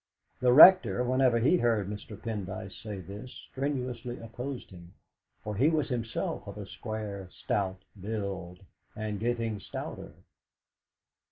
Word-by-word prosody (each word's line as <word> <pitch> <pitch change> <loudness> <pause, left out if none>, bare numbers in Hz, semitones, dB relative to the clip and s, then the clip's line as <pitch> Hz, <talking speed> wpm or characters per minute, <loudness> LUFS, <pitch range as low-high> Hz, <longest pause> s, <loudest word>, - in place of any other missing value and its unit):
The 125 -1 +4
Rector, 125 - +9
whenever 130 -1 +3
he 135 +10 +4
heard 115 - +1
Mr. 105 0 -7
Pendyce 105 -2 -5
say 105 -4 -6
this, 100 +7 -9 0.2
strenuously 125 -3 -3
opposed 125 +3 -7
him, 90 0 -13 0.5
for 105 0 -4
he 135 +9 +4
was 155 -3 0
himself 115 -3 -3
of - - -7
a - - -6
square, 105 -3 -6
stout 95 -2 -2 0.2
build, 95 -3 -4 0.3
and 105 -2 -3
getting 115 -2 -1
stouter. - - -7
110 Hz, 125 wpm, -30 LUFS, 100-125 Hz, 0.5 s, Rector